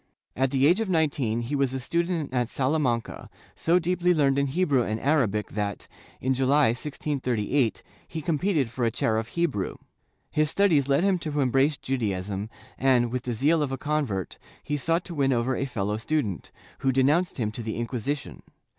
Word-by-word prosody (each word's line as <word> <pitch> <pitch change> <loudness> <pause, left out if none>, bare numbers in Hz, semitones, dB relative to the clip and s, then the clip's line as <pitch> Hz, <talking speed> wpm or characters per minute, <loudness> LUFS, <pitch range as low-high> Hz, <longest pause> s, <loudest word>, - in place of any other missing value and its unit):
At 135 +1 +1
the 135 0 +2
age 175 +7 +5
of 225 -3 -1
nineteen 140 -9 +1
he 120 +5 -3
was 135 -2 0
a - - -2
stu 170 +7 0
dent 170 -6 -3
at 125 -2 0
Salamanca, 130 -4 -1 0.3
so 170 +2 +2
deeply 180 0 +1
learned 140 -2 +3
in 140 - +1
Hebrew 145 -3 +2
and 110 -1 -2
Arabic 120 -8 +1
that, 100 -1 -3 0.3
in 130 +1 +1
July, 135 +1 +3
1638, 125 -2 -1 0.2
he 165 - -5
competed 155 - 0
for 120 +1 -3
a 115 - +3
chair 110 -1 0
of 110 0 -2
Hebrew. 165 - -1 0.6
His 155 0 +2
studies 160 -9 +3
led 140 +5 +3
him 195 -2 +2
to 150 -3 -3
embrace 135 +3 +2
Judaism 100 -5 -2 0.3
and, 125 -3 +3
with 125 0 -3
the 125 - -1
zeal 150 +7 +3
of 145 -3 -1
a 135 - -2
convert, 135 - -2 0.2
he 150 - -2
sought 165 +4 0
to 175 - -6
win 140 -3 +1
over 125 +1 +1
a 135 - -1
fellow 105 -5 -2
student, 115 - -2 0.3
who 135 - +2
denounced 145 +8 +2
him 110 -4 -1
to 115 - -6
the 110 -1 -4
Inquisi 120 +4 -2
tion. - - -11
135 Hz, 190 wpm, -26 LUFS, 120-155 Hz, 0.6 s, age